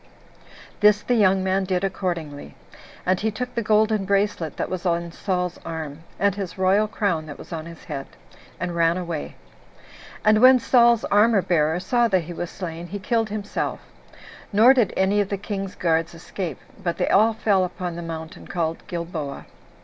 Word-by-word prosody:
This 210 0 +5
the 245 - 0
young 195 -4 +4
man 190 +1 +1
did 185 0 -1
accordingly; 170 -6 -4 0.5
and 185 0 +2
he 220 - 0
took 250 +4 -5
the 235 - -1
golden 215 -1 +2
bracelet 195 -5 0
that - - -1
was 185 -2 -4
on 170 -1 -1
Saul's 180 -1 -2
arm, 155 -3 -6 0.2
and 200 +1 +2
his 195 -2 -6
royal 190 +3 +3
crown 185 -6 -1
that 145 - -8
was - - -10
on 160 0 -5
his 170 -1 -11
head, 140 -3 -6 0.5
and 175 -1 -3
ran 170 +1 +3
away. 170 -4 -5 0.9
And 215 0 +5
when 255 +1 +8
Saul's 235 -1 +4
armor 210 -1 +4
bearer 160 -1 +1
saw 240 +5 +2
that 190 -4 +2
he 175 +2 -7
was 175 0 -4
slain, 170 -2 -6
he 200 +4 -5
killed 225 +2 0
himself; 205 0 -3 0.7
nor 225 +5 +7
did 240 -7 +2
any 195 +2 +3
of 200 - -2
the 200 - -1
king's 195 -1 -5
guards 165 0 0
escape, 175 +1 -5 0.2
but 170 -3 -2
they - - 0
all 220 +3 +5
fell 205 -4 +2
upon 180 -1 -4
the 170 - -5
mountain 160 -1 -7
called 165 -2 -2
Gilboa. 170 -6 -5
185 Hz, 180 wpm, -23 LUFS, 170-210 Hz, 0.9 s, when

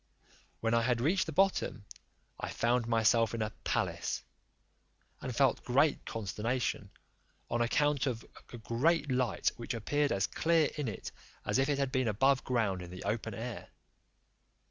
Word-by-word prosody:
When 115 0 +1
I 115 - +4
had 120 0 +1
reached 175 +10 +2
the - - -3
bottom, 175 - +1 0.5
I - - -3
found 120 0 +1
myself 115 0 +3
in 110 - -1
a 110 - -3
palace, - - -1 1.0
and 125 - -4
felt 135 -1 +3
great 140 +4 +2
consternation, 110 0 -2 0.6
on 120 - +1
account 145 +4 +2
of 115 -3 -3 0.3
a 120 - -7
great 140 +7 +1
light 125 -3 +1
which 120 0 -4
appeared 145 +6 0
as 95 0 +2
clear 165 +3 +2
in 150 -3 -2
it 110 - -5 0.3
as - - +1
if 135 +2 +2
it 145 - +1
had 135 -2 0
been 130 -2 +1
above 130 +6 +3
ground 110 -7 0
in 90 - -8
the 90 +1 -8
open 110 -1 -2
air. 115 0 -6
120 Hz, 160 wpm, -32 LUFS, 115-140 Hz, 1.0 s, I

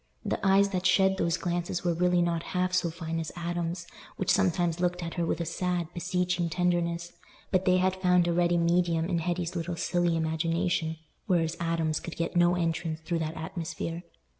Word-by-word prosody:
The - - -2
eyes 195 0 +5
that 185 -1 0
shed 190 -1 +4
those 170 +1 +1
glances 175 0 -2
were 175 -1 +2
really 180 +1 +2
not 170 -1 0 0.2
half 185 0 +1
so 180 -2 +2
fine 165 0 -4
as 160 - -4
Adam's, 175 0 -3 0.3
which 190 - +1
sometimes 175 -3 +2
looked 180 0 0
at 165 - -4
her 170 -2 -1
with - - -1
a 170 - -1
sad, 175 0 -2
beseeching 180 -1 0
tenderness, 175 0 0 0.4
but 185 -1 +2
they 185 -1 +4
had 185 0 +1
found 180 -1 +4
a 170 - +1
ready 175 0 +2
medium 170 -1 +2
in 170 -1 0
Hetty's 175 +1 -2
little 170 0 -2
silly 175 0 +1
imagination, 160 +1 0 0.3
whereas 170 -4 +1
Adam's 165 -2 0
could 170 - -7
get 170 +2 -2
no 175 0 +4
entrance 165 -2 -1
through 165 +1 -2
that 160 0 -3
atmosphere. 165 +1 -4
175 Hz, 190 wpm, -28 LUFS, 165-180 Hz, 0.4 s, eyes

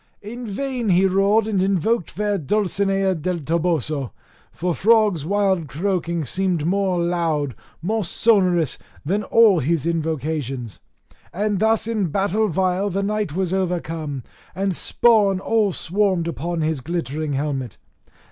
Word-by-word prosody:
In 235 +3 -7
vain 245 +1 -3
he 185 +1 +4
roared, 195 +3 +3
and 205 -4 0
invoked 195 +1 +1
fair 205 +2 -1
Dulcinea 195 +2 +1
del 180 +2 -2
Toboso: 155 -4 -1 0.4
for 180 +1 -2
frogs' 210 -6 +3
wild 195 -4 +1
croaking 170 +1 -2
seemed 180 +1 -1
more 190 0 +1
loud, 165 -5 0 0.3
more 215 +4 0
sonorous 180 - +2 0.3
than 195 +7 0
all 215 -5 +5
his 155 +2 0
invocations. 150 - -3 0.5
And 205 +1 -1
thus 220 +1 +2
in 215 -5 0
battle 200 +6 +1
vile 190 +2 0
the 195 +1 -1
knight 210 -6 -2
was 185 -1 -1
overcome, 165 -7 -2 0.3
and 195 0 -1
spawn 210 -4 +3
all 215 0 +1
swarmed 185 -1 0
upon 170 +3 -3
his 155 -3 -1
glittering 155 -1 -3
helmet. 135 -4 -3
185 Hz, 130 wpm, -22 LUFS, 160-205 Hz, 0.5 s, all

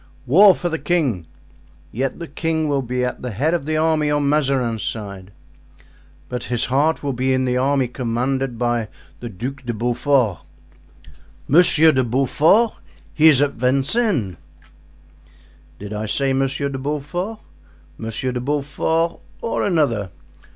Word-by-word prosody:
"War 185 +9 +6
for 175 - -3
the 165 -1 -3
king." 135 - -1 0.6
"Yet 130 +3 -3
the 170 - -7
king 160 +1 -2
will 140 -2 0
be 125 0 -2
at 125 - -5
the 125 - -4
head 135 - -1
of 165 -4 -2
the 155 0 0
army 155 -1 +1
on 145 -1 +1
Mazarin's 135 -6 0
side." 100 -4 -6 1.0
"But 125 -1 -5
his 120 -1 0
heart 150 +4 +1
will 140 -1 -1
be 130 +2 0
in 130 0 +1
the 125 0 0
army 135 0 +1
commanded 125 +1 -2
by 120 -2 -1 0.3
the 120 - -7
Duc 125 +7 -6
de 120 -2 -4
Beaufort." 120 - +1 1.1
"Monsieur 160 0 +7
de 130 -3 +1
Beaufort? 145 - +2 0.4
He 155 - +5
is 145 -3 +6
at 145 - 0
Vincennes." 135 - 0 1.4
"Did 105 +1 -8
I 105 +1 -4
say 135 +5 0
Monsieur 135 +1 -1
de 135 -1 -5
Beaufort? 150 +9 -4 0.6
Monsieur 115 +3 -3
de 125 -1 -4
Beaufort 150 +4 -1 0.2
or 230 - -2
another. 140 - 0
135 Hz, 145 wpm, -20 LUFS, 120-155 Hz, 1.4 s, Monsieur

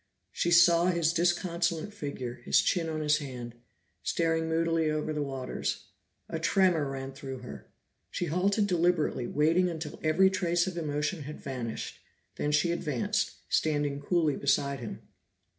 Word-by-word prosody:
She 175 - 0
saw 170 0 +6
his 170 -2 +2
disconsolate 170 +1 0
figure, 130 - -5
his - - +4
chin 165 -2 0
on 155 -1 -3
his 150 0 +3
hand, 125 -5 -7 0.5
staring 165 -1 0
moodily 165 -1 +1
over 155 0 -1
the 150 - -2
waters. 135 -2 -3 0.4
A 165 - -4
tremor 170 -4 +2
ran 135 0 -5
through 135 -1 -7
her, 125 - -9 0.4
she 175 - -2
halted 195 +6 +1
deliberately, 175 -8 +1
waiting 165 +5 +2
until 160 -3 -6
every 165 +5 +4
trace 175 -2 +1
of 185 -2 -4
emotion 150 +1 -2
had 150 - -7
vanished, 125 -4 -5 0.4
then 150 - 0
she 150 +3 +3
advanced, 150 -7 -1
standing 145 -2 +1
coolly 160 -1 +1
beside 140 0 +1
him. 115 - -7
160 Hz, 145 wpm, -29 LUFS, 145-170 Hz, 0.5 s, saw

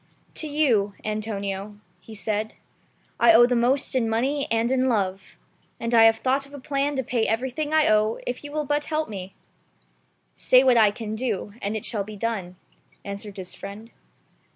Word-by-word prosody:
"To 310 - -5
you, 240 -10 +1
Antonio,'' 205 -1 -4 0.2
he 220 - -12
said, 215 +1 -3 0.6
"I 235 -1 +7
owe 235 +2 +8
the 245 0 +1
most 250 +4 +1
in 240 -4 +1
money 270 +6 0
and 230 +2 +1
in 260 0 +2
love; 195 -4 -2 0.4
and 230 +1 -3
I 225 -1 +7
have 225 0 +6
thought 270 +4 0
of 285 - -12
a - - -8
plan 285 +1 -1
to 265 - -1
pay 235 -2 0
everything 260 +7 -2
I 315 -1 +4
owe 215 +1 +3
if 245 +3 -4
you 290 - -8
will 300 0 -2
but 290 +1 0
help 310 -4 -2
me." 190 -2 -7 1.0
"Say 255 +1 +4
what 255 -2 +5
I 220 -3 +6
can 215 +1 -6
do, 220 -3 -3
and 205 +2 -2
it 215 - -7
shall 210 -3 -2
be 215 +1 -9
done," 200 -4 -3 0.5
answered 200 0 -7
his 185 -1 -7
friend. 210 +4 -9
225 Hz, 185 wpm, -24 LUFS, 210-265 Hz, 1.0 s, owe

